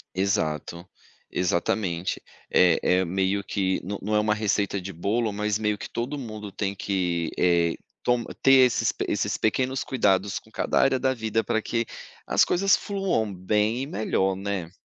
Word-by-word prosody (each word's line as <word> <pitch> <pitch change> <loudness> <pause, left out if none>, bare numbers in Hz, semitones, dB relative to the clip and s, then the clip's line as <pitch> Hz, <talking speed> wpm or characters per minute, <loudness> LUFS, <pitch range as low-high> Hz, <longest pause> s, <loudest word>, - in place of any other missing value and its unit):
Exato. 85 -2 -1 0.5
Exatamente. 90 0 -1 0.3
É 90 -2 +4 0.2
é - - 0
meio 95 +3 0
que 95 -2 -1
não 100 +2 -4
não 105 +2 -3
é 105 - +4
uma 105 0 +2
receita 100 -2 0
de 95 +2 -6
bolo, 105 +6 -1
mas 105 0 -1
meio 105 -1 0
que - - -7
todo 125 +5 -3
mundo 110 -6 -7
tem 100 0 -3
que, 90 -4 -1
eh, 85 -2 +3 0.3
tom 120 -1 +1 0.2
ter 135 -1 +7
esses 125 - +1 0.2
esses - - -1
pequenos 130 +4 0
cuidados 100 -4 +1
com 110 - -23
cada - - 0
área 135 -1 +3
da 130 -1 +1
vida 110 -2 -1
para 110 +1 -1
que 115 +1 -1 0.4
as - - +4
coisas 195 +2 +3
fluam 190 - -1
bem 105 +6 0
e - - -5
melhor, 95 -4 0
né? 95 -3 -4
105 Hz, 165 wpm, -25 LUFS, 95-115 Hz, 0.5 s, ter